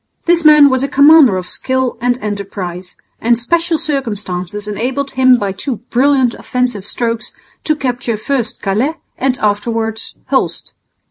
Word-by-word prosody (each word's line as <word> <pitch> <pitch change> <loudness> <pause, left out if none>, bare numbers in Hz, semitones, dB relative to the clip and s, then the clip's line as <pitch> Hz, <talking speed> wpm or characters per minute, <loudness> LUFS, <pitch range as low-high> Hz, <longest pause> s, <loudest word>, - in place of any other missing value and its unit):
This 340 -1 +3
man 300 -2 +7
was 260 0 +1
a - - +1
commander 280 -7 +6
of 180 -1 -5
skill 260 -1 -1
and 245 0 +1
enterprise, 190 -3 -5 0.2
and 235 +1 +2
special 335 +7 0
circumstances 210 - -4
enabled 255 +7 -3
him 255 -1 +4
by 200 -3 -2
two 240 +7 -4 0.2
brilliant 260 -1 +3
offensive 245 -6 -3
strokes 230 -1 -3 0.3
to 310 - +2
capture 245 -5 -2
first 240 0 -3
Calais 220 +11 0 0.2
and 260 -1 0
afterwards 220 +1 -2 0.2
Hulst. - - -1
245 Hz, 140 wpm, -15 LUFS, 210-275 Hz, 0.3 s, man